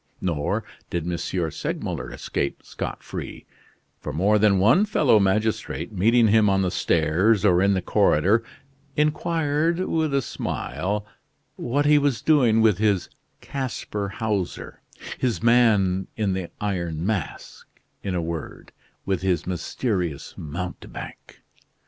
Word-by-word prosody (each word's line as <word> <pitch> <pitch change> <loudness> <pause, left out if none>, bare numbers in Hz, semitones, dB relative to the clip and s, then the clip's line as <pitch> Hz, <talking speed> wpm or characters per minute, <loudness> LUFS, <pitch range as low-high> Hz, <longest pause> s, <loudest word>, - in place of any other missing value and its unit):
Nor 80 -6 -1 0.3
did 85 -2 -2
M. 90 0 -1
Segmuller 85 -2 -3
escape 70 - -3
scot - - -6
free; - - -7 0.5
for - - -5
more 100 +6 +2
than 105 -2 +4
one 110 - +5
fellow 150 - +3
magistrate, 105 +4 0
meeting 110 +4 +4
him 110 -1 +5
on 95 0 +2
the 90 - 0
stairs 100 +6 +2
or 90 -3 +4
in 100 0 +3
the 95 - -1
corridor, 100 +11 +3 0.5
inquired, 155 +2 +1
with 160 -4 0
a 135 - +1
smile, 100 - -3 0.5
what 140 +4 -1
he 150 0 +6
was 140 -4 0
doing 125 -8 +4
with 105 -4 +3
his 105 -4 +1 0.3
Casper 115 -6 -4
Hauser, 100 -3 -3 0.4
his 120 -3 -1
man 105 -6 +3
in 105 -3 0
the 95 -2 -4
Iron 85 -5 -2
Mask, 100 -5 -4 0.3
in 95 -2 -3
a 85 - -1
word, 80 -2 -6 0.3
with 95 -2 -1
his 90 -4 0
mysterious 90 - -3
mountebank. 85 +4 -8
100 Hz, 130 wpm, -24 LUFS, 90-115 Hz, 0.5 s, he